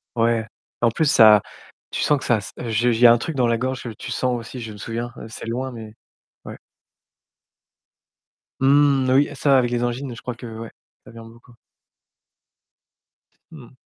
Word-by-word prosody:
Ouais. 115 -1 +1 0.4
En 120 - +4
plus 160 - 0
ça 110 -6 +7 0.5
tu - - -3
sens 150 - +2
que - - -8
ça 120 - +2
s 100 - -8
heu, 120 - -5
je 115 +2 +1
j 115 - -1
il - - -5
y - - +10
a - - +8
un - - +2
truc 155 +6 -5
dans 125 -3 +2
la 115 0 +1
gorge, 130 +2 -3
que 120 - -6
tu 110 - -8
sens 125 -1 -1
aussi, 115 +2 -8
je 115 -1 -7
me - - -12
souviens, 115 +4 -5
c'est 110 - -9
loin 125 +3 -4
mais 110 -2 -10 0.5
ouais. - - -9 2.0
Mmh, 140 -1 +3
oui 140 +2 +3
ça, 140 -1 +3
avec 125 -2 +1
les 120 0 -1
angines, 120 +1 -3
je 115 - -12
crois 125 0 -5
que, 120 - -11
ouais, 115 0 -8 0.3
ça - - -14
vient 115 -1 -12
beaucoup. 115 +1 -17 2.0
Mmh. 140 -7 -13
120 Hz, 195 wpm, -22 LUFS, 115-130 Hz, 2.0 s, y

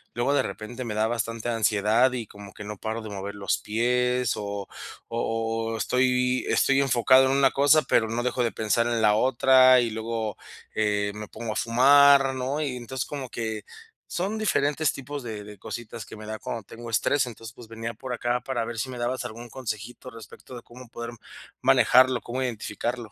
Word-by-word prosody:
Luego 120 +4 +1
de 145 - +3
repente, 120 +4 -6
me 105 -2 -4
da 110 +1 +2
bastante 115 0 -3
ansiedad 110 +2 +2
y 120 -3 -3
como 100 0 -12
que 105 - -9
no 105 0 -6
paro 110 +3 -4
de 110 - -7
mover 100 0 -6
los 100 -1 -1
pies 125 +2 +1
o 100 -1 -5 0.4
o 115 -1 -2
o - - -3
estoy 125 +1 +1
estoy 135 0 +3
enfocado 130 0 +5
en 130 - +1
una 135 -1 +4
cosa, 145 +2 +4
pero 110 -3 +2
no 120 +1 -2
dejo 125 0 0
de 115 - 0
pensar 115 +2 +1
en 115 -1 0
la 105 -1 +5
otra, 130 +2 +5
y 115 -2 -1
luego, 110 -1 -3 0.4
eh, 105 -1 +1
me 105 0 -7
pongo 115 -2 -5
a - - -4
fumar, 135 +3 +5
¿no? 130 +4 -2
Y, 140 -4 -2
entonces, 125 +2 -4
como 135 -4 -6
que 110 -2 -4 0.4
son 195 +5 -2
diferentes 150 -7 +1
tipos 140 +2 -6
de 110 -3 -6
de 105 -1 -11
cositas 115 0 -7
que - - -11
me 110 - -9
da 110 0 -5
cuando 115 -3 -5
tengo 115 +4 -10
estrés. 125 +5 +1
Entonces, 115 -1 -9
pues, 120 - -12
venía 115 0 -5
por 130 +3 -7
acá 120 +1 -1
para 120 -4 -2
ver 115 -1 -5
si 130 - -2
me 125 - -7
dabas 125 +2 -2
algún 120 +1 -8
consejito 125 0 -6
respecto 115 +2 -12
de 120 - -9
cómo 125 0 -14
poder 120 0 -6 0.5
manejarlo, 130 -1 +5
cómo 125 +2 -4
identificarlo. 120 -1 -4
120 Hz, 195 wpm, -26 LUFS, 110-130 Hz, 0.5 s, enfocado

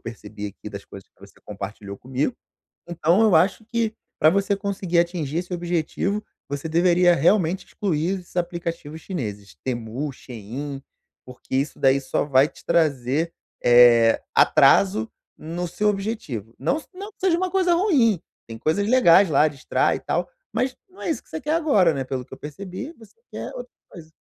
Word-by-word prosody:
percebi 105 -1 -8
aqui - - -11
das - - -8
coisas - - -13
que - - -37
você - - -15
compartilhou 100 0 -7
comigo. 135 - -2 0.5
Então 175 +4 +2
eu 210 -6 +4
acho 195 +6 +2
que, 230 -1 -1 0.2
pra 155 - +5
você 200 +2 +1
conseguir 195 -3 -2
atingir 170 -3 -2
esse 180 +1 -5
objetivo, 175 +4 -2 0.3
você 145 +3 -4
deveria 175 +2 +4
realmente 180 +3 +2
excluir 185 0 -1
esses 180 0 -18
aplicativos 170 -3 -4
chineses 105 - -6
Temu, 125 +3 -3
Shein, 130 +4 -7 0.4
porque 125 0 -9
isso 140 +2 -1
daí 135 +1 +4
só 130 +1 -1
vai 140 0 +4
te - - -18
trazer, 155 -1 +1 0.3
eh, 120 -1 +6
atraso 100 +3 +4 0.3
no 170 +3 -4
seu 210 +5 0
objetivo, 195 - -3
não 285 - 0
se - - -18
não 405 +3 -8
que - - -57
seja 365 -3 +3
uma 370 0 -1
coisa 360 -2 +2
ruim, 270 - +3 0.3
tem 115 - -8
coisas 180 - 0
legais 200 -6 +6
lá, 150 +2 +4
distrai 140 -3 0
e - - -8
tal, - - -2 0.2
mas 255 0 -1
não 380 +1 -15
é - - -2
isso - - -2
que - - -31
você 315 - -5
quer 300 +2 -2
agora, 275 - +3
né, 135 -1 -2
pelo 130 -1 -4
que - - -31
eu - - -17
percebi, 185 - -7
você 225 -3 -17 0.2
quer - - -6
outra - - -8 0.2
coisa. 160 -2 -12
170 Hz, 175 wpm, -23 LUFS, 130-200 Hz, 0.5 s, eh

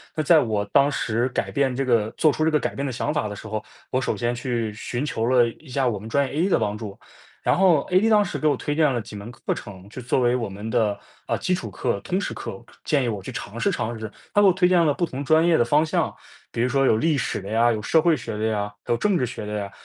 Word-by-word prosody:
那 155 - 0
在 160 +1 +6
我 105 -4 0
当 140 +7 +3
时 120 0 0
改 - - -2
变 135 -3 +1
这 135 - 0
个 115 -4 +1
做 155 -2 +3
出 155 - -1
这 160 - +2
个 150 - +3
改 - - -3
变 140 - -3
的 135 - -2
想 135 +4 -2
法 150 -8 -1
的 105 - -6
时 110 - -9
候， 110 0 -4 0.3
我 130 - 0
首 - - -1
先 120 0 -1
去 120 -3 -2
寻 120 +4 -4
求 115 -5 -2
了 125 -1 +4
一 140 +6 -10
下 130 0 0
我 105 - -2
们 105 +3 -9
专 140 +3 +1
业 130 - -9
A 170 +6 +1
的 - - +3
帮 105 +1 -1
助。 105 -3 -8 0.5
然 - - +3
后 175 -6 +4
AD 200 +5 +4
当 210 -2 +5
时 - - -4
给 155 - +1
我 145 - +2
推 145 - -2
荐 155 -3 +3
了 120 - -1
几 105 -1 -9
门 105 +4 -8
课 120 - -3
程， 95 -1 -10
就 125 +4 -9
作 120 +2 0
为 120 0 +3
我 115 -5 -2
们 100 +3 -7
的， 105 -2 +1 0.3
呃， - - 0
基 180 - -1
础 115 - -3
课， 100 +1 -2
通 185 - -2
识 - - -3
课、 95 - -8 0.2
建 145 -3 +1
议 120 - -1
我 105 -4 -3
去 - - -7
尝 115 +3 -7
试 - - +2
尝 120 0 -3
试。 110 -1 -6 0.2
他 205 - +5
给 205 - +6
我 190 - +7
推 180 0 +3
荐 180 -2 +4
了 150 - +3
不 175 - 0
同 140 -2 -5
专 160 +4 +4
业 170 -2 +4
的 - - +4
方 150 +6 +3
向， 155 - 0 0.4
比 - - -6
如 125 - +2
说 135 +1 +2
有 110 - +4
历 155 +5 +2
史 130 - -2
的 95 - -9
呀， 115 +3 +3
有 110 - -1
社 160 +6 +3
会 165 -3 +3
学 115 -2 -6
的 110 +1 -2
呀、 105 -2 -2
有 120 - +1
政 205 - +1
治 125 -6 +1
学 110 - -6
的 105 - -5
呀。 100 -1 -5
125 Hz, 325 characters per minute, -24 LUFS, 110-155 Hz, 0.5 s, 我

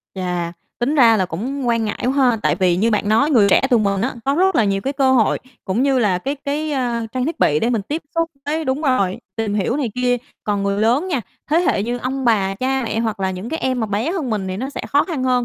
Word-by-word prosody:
Chà, 180 -2 -2 0.3
tính 260 +5 0
ra 230 -6 +6
là 185 -2 +1
cũng 250 +10 -3
quan 230 -1 +1
ngại 210 - -3
quá 255 - +2
ha! 260 -4 +3
Tại - - +2
vì 180 -3 +2
như 225 +5 +2
bạn 210 -1 0
nói 280 +8 +3
người 215 -7 +5
trẻ - - +5
tụi 240 -3 +4
mình 200 -2 0
á 250 +6 -1
có 275 +1 +1
rất 380 +4 +3
là 225 - +4
nhiều 195 -1 0
cái 270 - -2
cơ 270 -2 +2
hội 230 -4 +3 0.3
cũng 195 +6 0
như 270 -1 +2
là 205 -6 +2
cái 275 +10 -3
cái, 300 +2 -2
à, 245 -4 -1
trang 255 -1 -1
thiết 330 - -3
bị 150 - +3
để 235 - +1
mình 225 -4 0
tiếp 300 +11 -4
xúc 330 0 0 0.2
với 315 +2 -1
đúng 265 +2 -1
rồi, 200 -10 +1 0.2
tìm 220 -2 -1
hiểu 210 +5 0
này 265 -6 -1
kia. 250 0 +1 0.3
Còn 205 -1 0
người 200 0 0
lớn 245 +11 +2
nha, 285 -8 0 0.3
thế 315 - +4
hệ 320 - +1
như 240 +3 -2
ông 260 +2 -3
bà, 200 -5 +2
cha 265 +5 -1
mẹ 225 0 -1
hoặc 220 -3 -2
là 190 -1 0
những 185 +4 -6
cái 320 - -3
em 255 -1 0
mà 220 - 0
bé 210 +9 -1
hơn 315 -10 -3
mình 200 -3 -2
thì 185 - -3
nó 260 +6 -3
sẽ - - -5
khó 290 +1 +3
khăn 305 -8 -3
hơn. 250 -1 +2
240 Hz, 280 wpm, -20 LUFS, 205-275 Hz, 0.3 s, ra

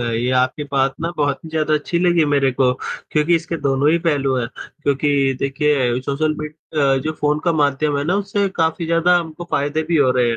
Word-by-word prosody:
ये 120 +1 -1
आपकी 130 +3 0
बात 135 0 +1
ना 165 - -2
बहुत 145 -2 0
ही - - -7
ज़्यादा 155 -1 +1
अच्छी 155 +3 -1
लगी 175 -2 +3
मेरे 140 -2 +2
को 125 0 +2 0.4
क्योंकि 155 +3 +2
इसके 165 +1 -4
दोनों 140 +2 +2
ही 170 - +3
पहलू 145 -6 0
हैं 120 -2 -2 0.3
क्योंकि 140 -1 +1
देखिए 135 -3 +1
सोशल 155 +3 -1
मीड 155 0 -5 0.3
अ, 135 -2 +3
जो 155 - -1
फ़ोन 150 0 +1
का 170 - +2
माध्यम 145 -1 +1
है - - -1
ना 175 +5 +1
उससे 200 0 -1
काफ़ी 160 0 0
ज़्यादा 170 +2 +3
हमको 165 0 -7
फ़ायदे 145 +3 0
भी 165 +1 0
हो 140 -4 +4
रहे 125 -1 +2
हैं, 115 - -1
150 Hz, 215 wpm, -19 LUFS, 135-160 Hz, 0.4 s, हो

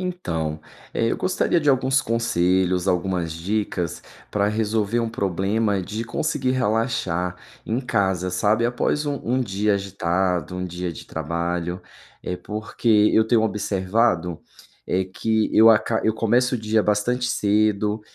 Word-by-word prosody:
Então, 80 - -3 0.3
eh, 115 - +1
eu - - -1
gostaria 185 -1 +1
de 150 - 0
alguns 135 0 +3
conselhos, 95 -7 +1
algumas 90 -2 0
dicas 90 -1 -2 0.3
pra 100 -1 +1
resolver 110 +1 0
um 115 - -1
problema 100 0 0
de 105 +5 -4
conseguir 130 +2 -1
relaxar 105 -7 0 0.3
em 115 +4 -1
casa, 95 -7 0
sabe, 105 +5 +1
após 125 +5 0
um 145 -1 -2
um 125 +3 +1
dia 105 -2 0
agitado, 95 -2 -1
um 90 - -3
dia 90 0 -4
de 80 - -10
trabalho. 85 +3 -3 0.4
Eh, 90 - -3
porque 105 +1 +1
eu 110 0 +4
tenho 115 -1 +3
observado, 95 -4 0 0.5
eh, 95 +1 0
que 110 +4 -1
eu 110 +1 +8
aca 110 0 +3
eu 110 - +2
começo 120 +3 +2
o - - -1
dia 110 0 +1
bastante 105 +5 0
cedo 105 -1 +1
105 Hz, 140 wpm, -23 LUFS, 90-115 Hz, 0.5 s, eu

